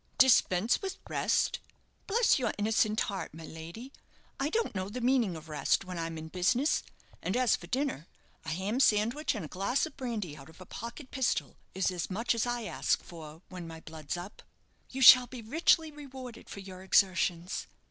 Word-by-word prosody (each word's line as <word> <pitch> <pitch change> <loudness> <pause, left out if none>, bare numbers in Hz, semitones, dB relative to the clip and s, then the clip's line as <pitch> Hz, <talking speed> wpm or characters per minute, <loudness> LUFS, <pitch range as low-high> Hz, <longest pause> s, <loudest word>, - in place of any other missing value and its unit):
"Dispense 225 -5 +4
with 385 -2 -4
rest? - - +1 0.5
Bless 445 - +3
your 235 -4 -1
innocent 215 +1 +2
heart, 195 -6 -3
my 160 0 -9
lady, 170 - -9 0.5
I 275 +2 0
don't 460 +7 0
know 190 -1 -3
the 240 +5 -5
meaning 240 -7 +2
of 160 0 -10
rest 155 +4 +1
when 180 -2 -5
I'm 165 0 -4
in 160 0 -7
business; 235 - +2 0.4
and - - -1
as 250 -4 +4
for 175 - -10
dinner, 255 - -2 0.4
a 160 - -6
ham 190 +9 -1
sandwich 235 +5 +2
and 205 -7 -4
a - - -6
glass 200 - 0
of 315 - -10
brandy 220 - -4
out 135 -1 -13
of 160 - -17
a 185 - -10
pocket 235 - -8
pistol 265 -3 -1 0.2
is 190 0 +1
as 175 -2 -3
much 225 +6 0
as 230 +1 0
I 240 -1 -2
ask 210 - 0
for 160 0 -11
when 180 -2 -7
my 165 0 -8
blood's 160 0 -6
up." 180 +4 -9 0.5
"You 265 +1 -1
shall 250 0 +10
be 245 -2 -9
richly 320 +5 +3
rewarded 265 -5 -10
for 200 - -7
your 185 -1 -10
exertions." 185 -2 +1
210 Hz, 190 wpm, -30 LUFS, 175-255 Hz, 0.5 s, shall